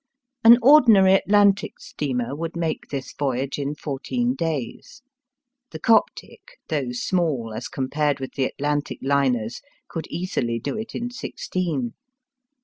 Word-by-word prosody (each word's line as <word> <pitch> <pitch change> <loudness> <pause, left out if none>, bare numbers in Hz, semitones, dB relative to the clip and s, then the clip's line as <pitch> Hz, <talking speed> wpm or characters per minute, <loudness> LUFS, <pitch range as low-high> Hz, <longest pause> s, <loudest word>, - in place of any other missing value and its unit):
An 230 +1 +9
ordinary 230 -9 +7
Atlantic 200 0 +3
steamer 130 -2 -3
would 165 +2 -5
make 165 -2 -3
this 135 -2 -5
voyage 135 0 -2
in 140 +1 -3
fourteen 240 - -2
days. 165 - -5 0.7
The - - -7
Coptic, 230 - 0
though 140 -6 -1
small 130 -4 -1
as 115 +2 -5
compared 145 +2 -1
with 130 - -6
the 135 - 0
Atlantic 145 +2 -2
liners, 130 -5 0 0.3
could 165 - -6
easily 125 -10 -2
do 115 - -4
it 220 +1 -6
in 245 +1 -3
sixteen. 165 - -3
150 Hz, 130 wpm, -23 LUFS, 130-190 Hz, 0.7 s, An